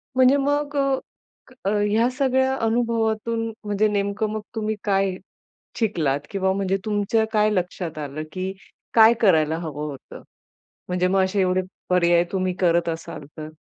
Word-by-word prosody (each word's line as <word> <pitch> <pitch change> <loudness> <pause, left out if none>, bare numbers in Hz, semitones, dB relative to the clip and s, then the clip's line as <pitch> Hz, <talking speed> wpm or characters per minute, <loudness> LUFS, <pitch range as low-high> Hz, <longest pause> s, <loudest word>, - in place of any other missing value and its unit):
म्हणजे 260 +1 +5
मग 290 +1 0 0.9
अ, - - +2
ह्या 210 +3 +2
सगळ्या 265 0 +1
अनुभवातून, 225 -1 0 0.2
म्हणजे 210 +1 +1
नेमकं 205 +1 -1
मग 215 - -3
तुम्ही 220 0 -1
काय 195 -2 +1 0.6
शिकलात? 155 - 0
किंवा 190 -1 0
म्हणजे 195 0 0
तुमच्या 215 +1 +1
काय 215 -1 +3
लक्षात 180 -4 -3
आलं, 150 0 -5
की 185 0 -3 0.4
काय 225 0 +8
करायला 160 -6 +3
हवं 150 -3 -5
होतं? 135 -2 -11 0.7
म्हणजे 180 0 +1
मग 190 +1 +3
असे 195 +1 0
एवढे 185 0 +2 0.3
पर्याय 175 -1 +4
तुम्ही 185 -1 0
करत 170 -2 +2
असाल 165 -3 -5
तर? 155 0 -6
200 Hz, 140 wpm, -23 LUFS, 180-220 Hz, 0.9 s, काय